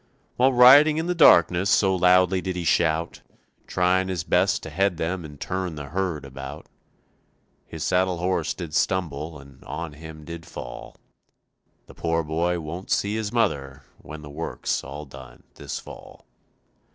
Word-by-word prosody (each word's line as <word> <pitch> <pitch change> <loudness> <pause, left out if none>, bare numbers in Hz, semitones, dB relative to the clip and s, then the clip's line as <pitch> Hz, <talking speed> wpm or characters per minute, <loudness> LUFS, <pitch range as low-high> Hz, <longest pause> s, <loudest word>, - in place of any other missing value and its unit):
While 130 +2 +4
riding 140 +5 +7
in 160 - -1
the 180 - 0
darkness 90 - +5
so 95 -1 +3
loudly 90 +1 +4
did 95 -1 -4
he 90 - -3
shout, 85 0 0 0.5
Trying 90 +1 +1
his 90 -4 -3
best - - +1
to 80 - -7
head 95 +2 +1
them 85 +2 -3
and 75 -2 -11
turn 95 -3 -3
the 75 -2 -8
herd 90 -4 -2
about, 70 +2 -9 1.0
His 80 -1 -6
saddle 90 +2 +1
horse 85 -3 -1
did 85 -3 -7
stumble 80 -4 -1
and 70 -2 -16
on 80 +1 -6
him 80 0 -11
did 85 0 -8
fall, - - -9 0.9
The - - -15
poor 80 0 -1
boy 85 +3 -1
won't 85 +4 -7
see 100 +1 0
his 110 -2 -3
mother 70 - -1 0.2
when 75 +1 -10
the 75 - -10
work's - - -3
all 75 +2 -8
done 65 -2 -13
this - - -6
fall. - - -12
85 Hz, 160 wpm, -24 LUFS, 75-95 Hz, 1.0 s, riding